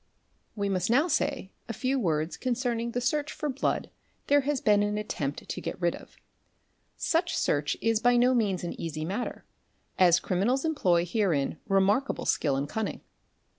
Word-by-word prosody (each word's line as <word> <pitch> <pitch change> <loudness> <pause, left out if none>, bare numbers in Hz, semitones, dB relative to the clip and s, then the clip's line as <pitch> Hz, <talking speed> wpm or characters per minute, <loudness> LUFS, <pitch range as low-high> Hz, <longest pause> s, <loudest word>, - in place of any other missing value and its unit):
We 200 -2 -1
must 185 0 0
now 275 +8 +4
say 240 - -1 0.2
a - - -2
few 265 +3 0
words 160 -5 0
concerning 240 -2 -1
the 240 - -2
search 290 +4 0
for 300 - -3
blood 270 0 -1 0.3
there 285 0 +4
has 280 0 -1
been 205 -3 +3
an 205 0 0
attempt 145 -9 -4
to - - -5
get 180 - -5
rid 175 -1 +1
of; - - -15 0.8
such 340 +1 0
search 145 0 0
is 225 -1 +2
by 245 +1 +4
no 250 +2 +4
means 205 -7 0
an 175 - -3
easy 155 -1 -4
matter, 200 +8 -4 0.5
as 175 -2 +6
criminals 235 - 0
employ 180 - +2
herein 170 -7 0
remarkable 200 +7 +2
skill 140 -4 +1
and 140 +2 -1
cunning. 220 +7 -3
210 Hz, 170 wpm, -28 LUFS, 175-255 Hz, 0.8 s, as